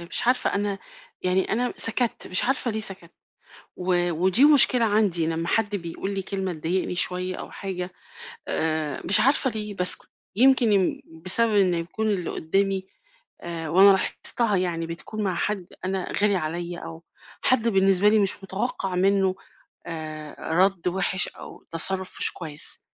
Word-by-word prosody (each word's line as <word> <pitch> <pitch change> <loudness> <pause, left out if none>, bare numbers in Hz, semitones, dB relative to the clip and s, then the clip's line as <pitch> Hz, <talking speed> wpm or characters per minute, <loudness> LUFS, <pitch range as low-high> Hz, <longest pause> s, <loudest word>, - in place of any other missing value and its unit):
مش 170 +7 -2
عارفة 250 0 +1
أنا 200 -1 -2 0.4
يعني 185 +1 0
أنا 245 +2 -1
سكتّ، 230 +1 0
مش 185 - +4
عارفة 260 -1 -1
ليه 220 0 -3
سكتّ. 190 -5 -2 0.6
و 175 -1 0
ودي 185 - +3
مشكلة 255 -5 +5
عندي 200 -6 +1
لمّا 165 +1 -3
حد 205 0 0
بيقول 185 +2 -5
لي 195 - -3
كلمة 190 -1 -4
تضايقني 175 +3 -3
شويّة 180 +1 -1
أو - - -9
حاجة 185 -2 -6 0.6
آآ، 155 -3 -2
مش 185 - +6
عارفة 270 0 +2
ليه 210 -2 -5
باسكُت. 180 -1 -1 0.3
يمكن 250 -2 +4
يم 190 -2 0 0.2
بسبب 220 +3 +3
إنّه 185 -4 +2
يكون 185 +6 -4
اللي 190 -5 -2
قُدّامي 195 +3 -1 0.5
آآ 165 -2 -6
وأنا 195 +5 +6
لاحظتها 205 +3 0
يعني 170 -2 -2
بتكون 210 +6 -6
مع 185 -3 -1
حد 200 -2 -3 0.2
أنا 190 -1 -3
غالي 205 -1 +2
عليّا 170 +1 -4
أو 165 0 -10 0.4
حد 235 -3 +2
بالنسبة 195 -1 +3
لي 220 - +3
مش 195 -1 0
متوقَّع 195 -1 -4
منّه 190 0 +1 0.5
آآ 155 -2 -7 0.2
رَد 185 0 +1
وِحِش 190 0 +3
أو - - -12
تصرُّف 185 +3 +4
مش - - +8
كويس. 155 -3 -1
190 Hz, 155 wpm, -24 LUFS, 175-210 Hz, 0.6 s, مش